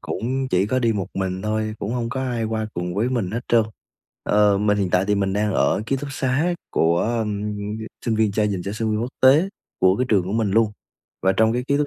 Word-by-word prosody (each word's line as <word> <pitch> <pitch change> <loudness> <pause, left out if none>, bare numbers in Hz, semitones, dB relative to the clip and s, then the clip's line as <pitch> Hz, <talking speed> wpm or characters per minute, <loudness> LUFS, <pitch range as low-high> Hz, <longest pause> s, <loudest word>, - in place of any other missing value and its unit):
cũng 130 +3 -2
chỉ 90 +2 +2
có 130 +4 +1
đi 115 -3 +2
một 95 -4 -2
mình 95 -1 -2
thôi, 110 0 -1
cũng 100 - -3
hông 120 -2 -2
có 130 +3 -3
ai 120 -3 -2
qua 110 0 -2
cùng 90 0 -3
với 110 +5 +1
mình 115 -8 -1
hết 115 - -2
trơn. 115 -1 +5 0.6
Ờ, 105 -1 +3
mình 105 0 +2
hiện 95 -3 0
tại 90 +1 +3
thì 105 - +3
mình 100 -1 0
đang 105 +1 0
ở - - +2
ký 135 - +1
túc 140 +2 -5
xá 135 +7 0 0.2
của, 85 +1 +2
ơm, 105 -2 -1 0.5
sinh 115 - +1
viên 110 -2 +2
trai 105 +1 +1
dành 95 -3 -2
cho 100 - -3
sinh 110 +1 -2
viên 105 0 0
quốc 120 - -3
tế 145 +8 +6 0.3
của 95 +1 +4
cái 125 - +1
trường 100 -6 +3
của 95 - -4
mình 110 -2 +1
luôn. 110 +1 +3 0.5
Và 95 - +4
trong 110 +2 +3
cái 125 +1 -1
ký 140 - +3
túc 145 0 +1
110 Hz, 255 wpm, -22 LUFS, 100-120 Hz, 0.6 s, tế